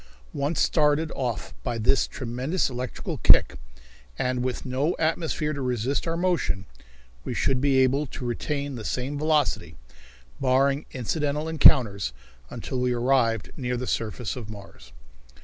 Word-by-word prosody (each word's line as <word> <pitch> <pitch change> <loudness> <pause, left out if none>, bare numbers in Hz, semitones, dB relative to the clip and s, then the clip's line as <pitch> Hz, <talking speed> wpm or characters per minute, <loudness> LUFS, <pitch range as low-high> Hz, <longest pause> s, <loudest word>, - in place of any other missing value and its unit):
Once 145 +3 -1
started 155 0 +2
off 120 -5 -3
by 120 -3 -3
this 120 +4 +2
tremendous 130 +7 -2
electrical 125 0 -5
kick, - - +5 0.6
and 125 -1 -1
with 130 -1 -3
no 135 +6 0
atmosphere 155 -1 0
to 140 - -4
resist 125 +4 -1
our 165 0 -1
motion, 170 - 0 0.6
we - - -4
should 130 -1 +1
be 140 -1 +3
able 135 +3 +3
to 125 - -7
retain 140 +4 -2
the 115 -3 -6
same 130 +6 -3
velocity, 145 - 0 0.6
barring 135 +2 +2
incidental 145 +4 -2
encounters, 120 - +5 0.4
until 130 - -4
we 125 0 +1
arrived 120 -3 +1
near 125 -2 -2
the 125 - -3
surface 115 -2 -2
of 115 -4 -7
Mars. 100 - -12
130 Hz, 140 wpm, -26 LUFS, 120-145 Hz, 0.6 s, kick